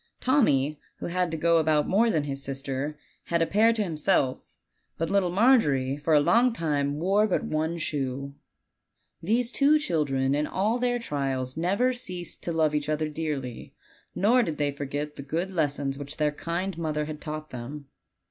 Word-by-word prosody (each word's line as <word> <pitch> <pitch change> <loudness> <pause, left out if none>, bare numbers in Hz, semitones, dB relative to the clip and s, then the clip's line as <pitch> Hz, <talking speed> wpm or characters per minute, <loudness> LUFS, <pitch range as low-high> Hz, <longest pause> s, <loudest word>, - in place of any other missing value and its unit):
Tommy, 155 - +2 0.2
who - - -6
had 180 0 0
to 160 - -3
go 170 +1 +3
about 155 -2 +2
more 225 +5 +3
than 155 -8 +1
his 140 -1 -4
sis 135 0 -4
ter, 145 +2 -3 0.3
had 170 - 0
a 165 - +3
pair 215 +6 +4
to 225 -2 0
himself; 155 -6 -1 0.4
but 165 0 -2
little 200 -3 +2
Margery 175 - +3
for 150 +2 +1
a - - +7
long 235 +11 +4
time 145 -7 -1
wore 200 +5 +3
but 190 - 0
one 160 +2 -1
shoe. 140 -3 -3 0.9
These 230 +7 +1
two 290 +2 +4
children 140 - 0
in 150 +1 0
all 215 +6 0
their 245 0 +1
trials 135 - -2
never 200 +10 +1
ceased 180 -8 -5
to 170 - -2
love 160 -2 +2
each 150 0 -1
other 155 0 0
dearly, 145 -6 -5 0.4
nor 235 +6 +4
did 160 -10 -2
they 145 -1 0
forget 145 +1 -5
the - - -5
good 165 +7 -3
les 150 -6 0
gons 135 -1 -3
which 145 +1 -7
their 150 -1 +2
kind 170 +4 -4
mother 155 -2 -1
had 150 0 -7
taught 155 0 -6
them. 135 +4 -7
155 Hz, 185 wpm, -27 LUFS, 145-190 Hz, 0.9 s, a